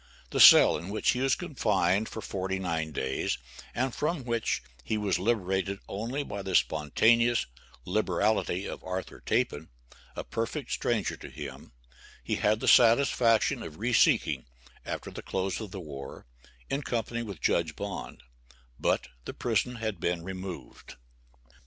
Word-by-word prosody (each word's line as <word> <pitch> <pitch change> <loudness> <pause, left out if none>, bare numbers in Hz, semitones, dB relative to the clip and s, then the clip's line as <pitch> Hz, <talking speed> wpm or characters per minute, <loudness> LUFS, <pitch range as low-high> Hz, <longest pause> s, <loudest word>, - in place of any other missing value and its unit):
The - - -1
cell - - +9
in 90 - -8
which 105 - +1
he 125 - -2
was 135 0 +3
confined 105 - 0
for 110 - -6
forty 95 0 -3
nine 85 -4 -2
days, 65 -3 -2 0.4
and 130 0 0
from 155 -1 -1
which 115 - -1 0.2
he 110 - -1
was 100 -4 0
liberated 95 -2 0
only 120 +8 -3
by 100 -7 -6
the 95 -1 -3
spontaneous 115 +10 +3 0.4
liberality 100 0 0
of - - -6
Arthur 95 0 -5
Tappan, 75 +2 -1 0.5
a - - -4
perfect 115 +4 -4
stranger 110 -8 0
to - - -10
him, 70 -4 -9 0.5
he - - -1
had 105 +1 +1
the - - -2
satisfaction 115 -1 +5
of 75 - -8
reseeking, 115 +1 +2 0.4
after - - -5
the - - -7
close 95 0 -2
of 110 - -6
the 95 - -7
war, 70 -5 -8 0.4
in 140 - -2
company 120 -2 -2
with 100 -8 -7
Judge 80 0 +1
Bond, 100 -10 -6 0.6
but - - +1 0.2
the - - -6
prison 120 +1 0
had 110 -5 -3
been 85 0 -1
removed. 95 -7 -8
100 Hz, 145 wpm, -29 LUFS, 90-115 Hz, 0.6 s, cell